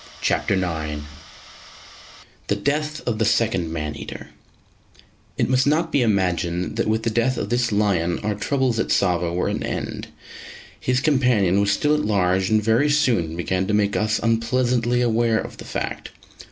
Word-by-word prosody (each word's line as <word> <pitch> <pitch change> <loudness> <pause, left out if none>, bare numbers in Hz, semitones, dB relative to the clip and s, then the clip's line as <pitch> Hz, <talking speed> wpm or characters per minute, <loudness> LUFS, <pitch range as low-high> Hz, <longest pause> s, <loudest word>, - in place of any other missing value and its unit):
CHAPTER 100 - +1
IX 80 -5 -3 1.4
THE 100 - +1
DEATH 150 +7 -2
OF 115 -3 -1
THE 110 - +2
SECOND 105 -7 +1
MAN 75 -2 -4
EATER - - -9 1.1
It - - +1
must 130 +1 +2
not 160 +3 +1
be 140 - +2
imagined 90 -5 0
that - - 0
with 110 +1 0
the 115 - 0
death 120 +3 +1
of - - -3
this 120 -1 +1
lion 95 -5 +1
our 105 0 0
troubles 130 +2 0
at - - 0
Tsavo 90 -3 +1
were 90 +1 -1
at - - -1
an - - -5
end; - - -4 0.7
his 125 0 0
companion 125 - +2
was 100 - +1
still 150 +9 +2
at 150 - +1
large, 95 -2 +1
and 110 -1 +2
very 115 +7 +3
soon 115 - +1
began 95 +2 -1
to 105 - +1
make 100 -1 +1
us 105 0 +1
unpleasantly 120 +1 +1
aware 115 -1 +2
of - - -7
the - - -10
fact. - - -4
110 Hz, 170 wpm, -22 LUFS, 95-125 Hz, 1.4 s, very